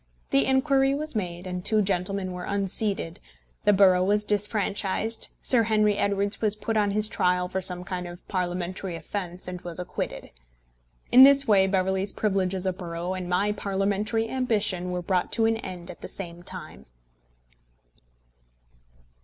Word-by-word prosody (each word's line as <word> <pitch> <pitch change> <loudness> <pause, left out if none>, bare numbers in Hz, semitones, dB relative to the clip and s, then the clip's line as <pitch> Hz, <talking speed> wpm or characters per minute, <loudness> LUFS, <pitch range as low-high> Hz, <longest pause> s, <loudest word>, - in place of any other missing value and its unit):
The 135 - +3
inquiry 270 0 +3
was 305 -2 -5
made, 175 -3 -3
the 180 -1 -4
two 215 +2 +2
gentlemen 190 0 -1
were 180 0 -6
unseated, 200 -3 0 0.5
the - - +6
borough 185 -2 +5
was 210 +2 +1
disfranchised, 210 +1 0 0.2
Sir 245 -3 +4
Henry 215 -2 +2
Edwards 200 0 0
was 215 -2 +1
put 220 +1 -3
on 210 -1 +2
his 210 +1 +2
trial 180 -3 +1
for 190 +1 -3
some 180 -1 -1
kind 180 -1 -5
of 175 0 -11
Parliamentary 180 0 -3
offence 180 +2 -6
and 180 -1 -6
was 175 -2 -7
acquitted. 180 - -5 0.8
In 255 +2 +10
this 275 0 +7
way 195 -3 +5
Beverley's 190 +1 +1
privilege 195 -3 0
as 185 0 -3
a 185 - +1
borough 175 0 -5
and 185 -1 -5
my 195 +4 +1
Parliamentary 205 +2 -1
ambition 210 -8 -1
were 180 0 -3
brought 180 0 0
to 225 - +2
an 225 0 +2
end 180 -5 -7
at 175 - -14
the - - -6
same 175 -3 -6
time. 65 - -9
195 Hz, 160 wpm, -26 LUFS, 180-210 Hz, 0.8 s, In